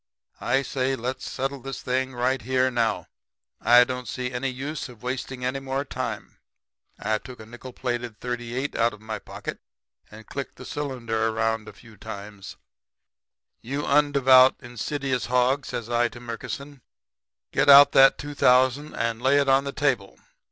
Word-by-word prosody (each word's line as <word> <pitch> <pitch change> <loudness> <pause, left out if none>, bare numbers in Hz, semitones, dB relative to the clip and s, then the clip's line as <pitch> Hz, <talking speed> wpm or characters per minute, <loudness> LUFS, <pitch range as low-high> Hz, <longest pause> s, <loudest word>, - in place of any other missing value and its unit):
'I 135 +3 +1
say 130 0 -1
let's 125 +2 -4
settle 135 +1 -3
this 135 0 -7
thing 130 0 -1
right 130 +2 0
here 130 +1 +1
now. 115 -2 0 0.6
I 120 +1 +7
don't 125 0 -5
see 125 0 -4
any 125 +2 -2
use 135 +3 -5
of 120 -2 -15
wasting 125 0 -4
any 130 +2 -1
more 135 +1 -3
time.' 120 -6 -5 0.6
I 110 +1 -1
took 125 +2 -12
a 110 - -10
nickel 120 +3 -10
plated 120 -3 -4
.38 125 +2 -4
out 115 0 +2
of 105 - -20
my 110 -1 -5
pocket - - -7 0.5
and 110 +1 -13
clicked 140 +4 -6
the 130 - -11
cylinder 120 -7 -2
around 110 0 -1
a - - -9
few 110 -3 -17
times. 100 0 -9 1.1
"'You 140 +5 -4
undevout, 135 -3 +5
sinful, 120 - -13
insidious 130 +1 -2
hog,' 125 +2 +1
says 115 - -5
I 120 0 +2
to 120 - -11
Murkison, 125 +4 -7 0.7
'get 145 - +2
out 140 +1 +10
that 135 0 +6
two 145 0 -7
thousand 130 +2 +3
and 115 0 -2
lay 135 +2 +4
it 140 - +1
on 135 +1 +4
the 140 - -3
table. 130 -10 -1
125 Hz, 165 wpm, -25 LUFS, 120-135 Hz, 1.1 s, out